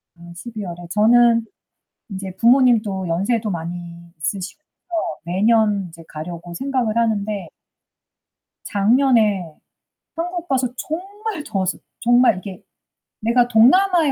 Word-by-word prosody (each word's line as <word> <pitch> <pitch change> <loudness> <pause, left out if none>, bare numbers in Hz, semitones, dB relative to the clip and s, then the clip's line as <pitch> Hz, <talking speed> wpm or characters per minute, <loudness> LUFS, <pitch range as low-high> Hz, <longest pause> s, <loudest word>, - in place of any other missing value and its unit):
아 170 0 -13
12 220 +3 -7
월에. 175 -1 -8
저는 230 +2 +4 0.7
이제 190 0 -6
부모님도 230 -5 +3
연세도 210 +6 0
많이 170 0 -7
있으시고요 190 - -4 0.6
매년 205 +2 +2
이제 165 0 -14
가려고 170 +2 -8
생각을 255 -2 -1
하는데 210 -5 -1 1.2
작년에 210 - +2 0.6
한국 350 +1 -4
가서 260 -3 +1
정말 390 - -5
더웠어. 190 -6 -2 0.3
정말 240 -3 +4
이게 185 -1 -9 0.6
'내가 240 +2 +3
동남아에 310 - +4
215 Hz, 240 characters per minute, -20 LUFS, 180-245 Hz, 1.2 s, 저는